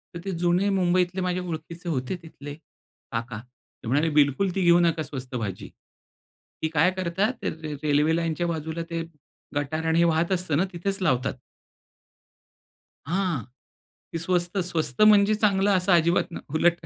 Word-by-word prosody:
तर 170 Hz, -, -4 dB
ते 195 Hz, -, -2 dB
जुने 180 Hz, +3 st, +2 dB
मुंबईतले 185 Hz, -1 st, +1 dB
माझे 180 Hz, 0 st, -1 dB
ओळखीचे 170 Hz, 0 st, -6 dB
होते 130 Hz, +1 st, -2 dB
तिथले 145 Hz, -3 st, -9 dB, 0.6 s
काका. 115 Hz, -1 st, -4 dB, 0.4 s
ते -, -, -7 dB
म्हणाले 145 Hz, +6 st, +2 dB
बिलकुल 150 Hz, +5 st, +3 dB
ती 190 Hz, -, 0 dB
घेऊ 175 Hz, 0 st, +6 dB
नका 165 Hz, -2 st, +2 dB
स्वस्त 130 Hz, -3 st, -7 dB
भाजी. 100 Hz, -6 st, -4 dB, 0.9 s
ती 160 Hz, -, +3 dB
काय 165 Hz, +5 st, +4 dB
करतात 190 Hz, +7 st, 0 dB
ते -, -, -1 dB
रे 155 Hz, -1 st, -6 dB
रेल्वे 150 Hz, +2 st, +3 dB
लाईनच्या 170 Hz, +1 st, -1 dB
बाजूला 160 Hz, 0 st, -3 dB
ते 165 Hz, -1 st, -2 dB, 0.5 s
गटार 155 Hz, +3 st, -2 dB
आणि 160 Hz, +1 st, +2 dB
हे -, -, +5 dB
वाहत 165 Hz, +2 st, +1 dB
असतं 175 Hz, -5 st, +1 dB
ना 185 Hz, -, +2 dB
तिथेच 195 Hz, +3 st, -2 dB
लावतात. 130 Hz, -8 st, +1 dB, 1.7 s
हां, 180 Hz, -6 st, 0 dB, 0.7 s
ती 165 Hz, -, -1 dB
स्वस्त, 175 Hz, +2 st, 0 dB
स्वस्त 165 Hz, -7 st, -1 dB
म्हणजे 215 Hz, 0 st, +6 dB
चांगलं 205 Hz, -1 st, +2 dB
असं 185 Hz, 0 st, +2 dB
अजिबात 170 Hz, +1 st, +3 dB
नाही -, -, -7 dB
उलट 170 Hz, +1 st, +2 dB
170 Hz, 155 wpm, -25 LUFS, 155-185 Hz, 1.7 s, घेऊ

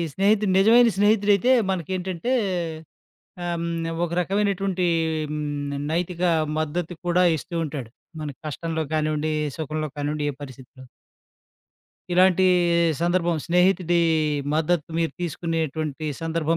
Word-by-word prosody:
స్నేహితుడు 200 Hz, +1 st, +2 dB
నిజమైన 230 Hz, +4 st, +6 dB
స్నేహితుడైతే 205 Hz, +2 st, +3 dB, 0.2 s
మనకేంటంటే, 185 Hz, -, -2 dB, 1.1 s
హ్మ్, 170 Hz, -1 st, -2 dB, 0.3 s
ఆహ్! 165 Hz, -, -5 dB
ఒక 170 Hz, -, -8 dB
రకమైనటువంటి 195 Hz, -1 st, 0 dB, 0.4 s
హ్మ్, 145 Hz, -1 st, -3 dB, 0.2 s
నైతిక 175 Hz, +1 st, -2 dB, 0.4 s
మద్దతు 165 Hz, +3 st, -3 dB
కూడా 180 Hz, +1 st, +3 dB
ఇస్తూ 170 Hz, -, -8 dB
ఉంటాడు. 140 Hz, -6 st, -6 dB, 0.3 s
మన 150 Hz, -, -4 dB, 0.2 s
కష్టంలో 160 Hz, +2 st, -3 dB
కానివ్వండి, 155 Hz, 0 st, 0 dB, 0.3 s
సుఖంలో 155 Hz, 0 st, -3 dB
కానివ్వండి 145 Hz, +1 st, -2 dB
ఏ -, -, -11 dB
పరిస్థితిలో. 130 Hz, 0 st, -12 dB, 1.3 s
ఇలాంటి 185 Hz, +1 st, +4 dB, 0.6 s
సందర్భం, 175 Hz, -1 st, +1 dB
స్నేహితుడి 180 Hz, 0 st, +3 dB, 0.6 s
మద్దతు 160 Hz, 0 st, 0 dB
మీరు 165 Hz, -1 st, 0 dB
తీసుకునేటువంటి 160 Hz, -2 st, -3 dB, 0.2 s
సందర్భం 165 Hz, 0 st, 0 dB
170 Hz, 100 wpm, -24 LUFS, 155-185 Hz, 1.3 s, నిజమైన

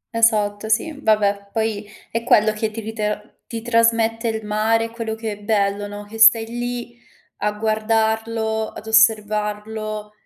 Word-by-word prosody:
Esatto 215 Hz, -2 st, +2 dB
sì, 220 Hz, +9 st, +1 dB
vabbè, 205 Hz, -3 st, +1 dB
poi 220 Hz, -2 st, -2 dB, 0.2 s
è 230 Hz, 0 st, -2 dB
quello 215 Hz, -2 st, +4 dB
che 215 Hz, +1 st, -2 dB
ti 220 Hz, +1 st, -7 dB
ritra 215 Hz, -1 st, -3 dB, 0.3 s
ti 225 Hz, -1 st, -6 dB
trasmette 230 Hz, 0 st, +2 dB
il 220 Hz, -1 st, -3 dB
mare, 225 Hz, +2 st, +1 dB
quello 230 Hz, -1 st, -4 dB
che 220 Hz, -1 st, -4 dB
è 205 Hz, -, -7 dB
bello, 205 Hz, -1 st, 0 dB
no, 205 Hz, 0 st, -8 dB
che 220 Hz, +2 st, -10 dB
stai 225 Hz, 0 st, +7 dB
lì, 240 Hz, +1 st, -5 dB, 0.4 s
a 210 Hz, -, 0 dB
guardarlo, 220 Hz, +1 st, 0 dB
ad 215 Hz, -, -11 dB
osservarlo, 215 Hz, -1 st, +1 dB
220 Hz, 145 wpm, -21 LUFS, 210-225 Hz, 0.4 s, stai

